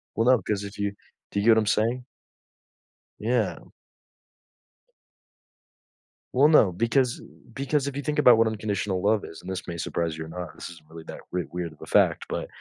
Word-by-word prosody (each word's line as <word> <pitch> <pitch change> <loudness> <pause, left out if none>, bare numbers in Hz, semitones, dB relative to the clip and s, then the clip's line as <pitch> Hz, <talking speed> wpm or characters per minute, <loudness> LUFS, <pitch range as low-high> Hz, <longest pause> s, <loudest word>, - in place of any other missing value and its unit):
Well, 115 - +1
no. 125 -3 +5
'Cause 100 +2 -2
if 100 +1 -8
you 100 0 -1 0.4
do 100 - -1
you 100 - -1
get 115 - +7
what 110 - +5
I'm 110 - 0
saying? 115 +4 +1 1.2
Yeah. - - -1 2.7
Well, 135 +4 +6
no, 150 - +5
because, 120 +6 +1
uh, - - -13 0.3
because 140 +1 -1
if 140 - -4
you 140 - -2
think 150 +1 -1
about 125 -5 +7
what 115 - +4
unconditional 100 -3 -2
love 105 0 +2
is 80 - -10
and 95 - -7
this 95 0 -5
may 85 - -5
surprise 80 -1 -2
you 80 - -5
or 80 - -11
not, 90 -2 -7
this - - -8
isn't 80 -3 -15
really 80 0 -10
that - - -8
we 90 -1 -1
weird 85 -2 -4
of - - -23
a - - -7
fact - - +3
but - - -3
105 Hz, 200 wpm, -26 LUFS, 90-120 Hz, 2.7 s, get